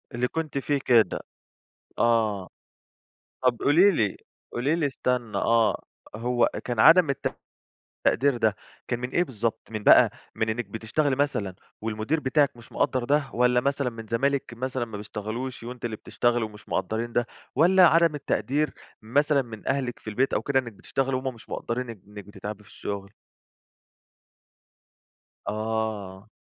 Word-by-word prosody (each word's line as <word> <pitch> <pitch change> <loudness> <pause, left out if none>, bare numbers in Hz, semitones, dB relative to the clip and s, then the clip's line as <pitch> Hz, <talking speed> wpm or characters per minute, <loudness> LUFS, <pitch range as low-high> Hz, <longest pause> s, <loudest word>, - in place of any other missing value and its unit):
اللي 125 +1 +1
كنتِ 160 -2 -3
فيه 140 +1 0
كده، 115 -6 +4 0.8
آه، 110 -5 +2 1.0
طَب 125 -2 +3
قولي 180 +8 +5
لي 105 - 0 0.4
قولي 140 +7 +1
لي 155 -4 +1
استنى 125 -4 -2
آه، 115 -1 +2 0.3
هو 120 +2 +2
كان 120 -3 -3
عدم 165 +3 +7
الت 140 - -2 0.7
التقدير 135 +2 +3
ده 110 -4 +1 0.3
كان 120 - -1
من 125 - -3
إيه 175 +5 +2
بالضبط؟ 115 -4 -2
من 110 -2 -4
بقى - - +7 0.2
من 110 - -1
إنِّك 110 0 -2
بتشتغلي 115 +7 -1
مثلًا 110 -10 0 0.3
والمدير 110 +8 -1
بتاعِك 140 -1 +2
مش 120 - -16
مقدّر 130 -2 +1
ده؟ 145 0 +1
والَّا 125 0 +4
مثلًا 140 -1 0
من 115 -1 -9
زمايلِك 135 +2 0
مثلًا 130 0 -2
ما 110 -3 -8
بيشتغلوش 110 +5 -5
وأنتِ 120 0 -8
اللي 110 -2 -2
بتشتغلي 120 +1 0
ومش 105 -1 -10
مقدرّين 115 +2 -2
ده؟ 120 0 +1 0.3
والَّا 180 +4 +6
عدم 165 -2 +4
التقدير 145 +1 -1 0.3
مثلًا 140 +4 +2
من 110 -4 -8
أهلِك 130 -3 -1
في 110 - -7
البيت 130 +6 +1
أو - - 0
كده 140 -1 +2
إنِّك 120 -3 -3
بتشتغلي، 135 +5 -2
وهم 130 -1 -3
مش 115 - -17
مقدرّين 120 0 -3
إن 105 -5 -10
إنِّك 105 -1 -9
بتتعبي 105 +1 -8
في - - -19
الشغل؟ 100 -1 -6 2.4
آه. 110 -2 -3
120 Hz, 150 wpm, -26 LUFS, 110-140 Hz, 2.4 s, عدم